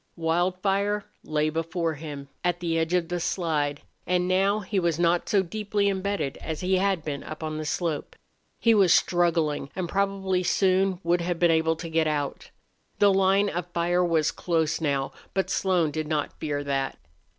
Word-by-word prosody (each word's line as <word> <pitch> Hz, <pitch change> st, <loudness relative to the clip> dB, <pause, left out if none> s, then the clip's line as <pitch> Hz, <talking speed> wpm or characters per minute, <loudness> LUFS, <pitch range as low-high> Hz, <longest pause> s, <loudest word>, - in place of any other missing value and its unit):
Wildfire 185 Hz, +5 st, 0 dB, 0.2 s
lay 155 Hz, 0 st, 0 dB
before 165 Hz, +1 st, -1 dB
him, 145 Hz, -2 st, -7 dB, 0.2 s
at 175 Hz, -1 st, 0 dB
the 170 Hz, -2 st, -1 dB
edge 165 Hz, +2 st, 0 dB
of 170 Hz, -2 st, 0 dB
the 175 Hz, 0 st, -1 dB
slide, 155 Hz, -5 st, -1 dB, 0.3 s
and 180 Hz, 0 st, +1 dB
now 195 Hz, +3 st, +2 dB
he 200 Hz, 0 st, -1 dB
was 170 Hz, -3 st, 0 dB
not 175 Hz, 0 st, +1 dB
so 200 Hz, -3 st, +3 dB
deeply 205 Hz, +1 st, -1 dB
embedded 195 Hz, -7 st, -2 dB
as 160 Hz, -2 st, -5 dB
he 185 Hz, +1 st, +2 dB
had 190 Hz, -4 st, 0 dB
been 145 Hz, -2 st, -3 dB
up 155 Hz, +1 st, -8 dB
on 155 Hz, 0 st, -3 dB
the 155 Hz, -, -4 dB
slope. 160 Hz, -1 st, -2 dB, 0.4 s
He 230 Hz, -, +4 dB
was 195 Hz, -5 st, +5 dB
struggling 165 Hz, -6 st, +2 dB
and 185 Hz, -1 st, -2 dB
probably 195 Hz, -1 st, 0 dB
soon 185 Hz, 0 st, +2 dB
would 170 Hz, +1 st, +2 dB
have 175 Hz, 0 st, -1 dB
been 170 Hz, 0 st, +4 dB
able 160 Hz, 0 st, +2 dB
to 165 Hz, +1 st, -7 dB
get 160 Hz, -1 st, +1 dB
out. 145 Hz, -2 st, -3 dB, 0.5 s
The 205 Hz, -1 st, +5 dB
line 195 Hz, +1 st, +3 dB
of 175 Hz, -1 st, -3 dB
fire 175 Hz, +1 st, +2 dB
was 165 Hz, -3 st, +2 dB
close 160 Hz, -2 st, 0 dB
now, 140 Hz, -3 st, 0 dB, 0.2 s
but 190 Hz, -, 0 dB
Slone 180 Hz, -5 st, +1 dB
did 155 Hz, 0 st, -3 dB
not 150 Hz, -2 st, -1 dB
fear 145 Hz, -2 st, -2 dB
that. 135 Hz, -1 st, -2 dB
175 Hz, 180 wpm, -26 LUFS, 155-190 Hz, 0.5 s, was